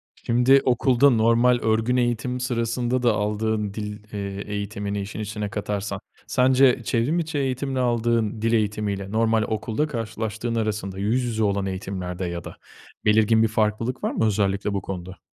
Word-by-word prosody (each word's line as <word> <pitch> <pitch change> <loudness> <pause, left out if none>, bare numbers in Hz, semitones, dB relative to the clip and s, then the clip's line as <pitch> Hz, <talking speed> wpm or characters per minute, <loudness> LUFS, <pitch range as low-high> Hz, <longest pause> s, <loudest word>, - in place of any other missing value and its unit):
Şimdi, 125 +3 +4
okulda 130 +2 +4
normal 120 +1 +4
örgün 110 +3 +1
eğitim 120 +1 0
sırasında 120 0 -1
da 120 -2 +4
aldığın 105 0 -1
dil, 105 -1 -5
eee, 100 -1 -4
eğitimini 100 0 -3
işin 100 +2 -6
içine 105 -1 -4
katarsan, 100 -1 -3 0.3
sence 130 -1 +4
çevrim 125 +10 +1
içi 160 -2 -3
eğitimle 135 0 -1
aldığın 115 -3 0
dil 115 +1 +1
eğitimi 105 -2 0
ile 100 0 -6
normal 110 0 +2
okulda 110 +7 -1
karşılaştığın 115 -2 -3
arasında, 105 -4 -2
yüz 115 +6 +1
yüze 110 -2 -1
olan 100 -1 +1
eğitimlerde 95 -1 -4
ya 85 -1 -4
da - - -10 0.5
belirgin 110 +1 +4
bir - - +4
farklılık 110 +3 -1
var - - 0
mı 110 - 0
özellikle 100 -1 0
bu 100 - -1
konuda? 95 -1 -7
110 Hz, 155 wpm, -24 LUFS, 105-120 Hz, 0.5 s, Şimdi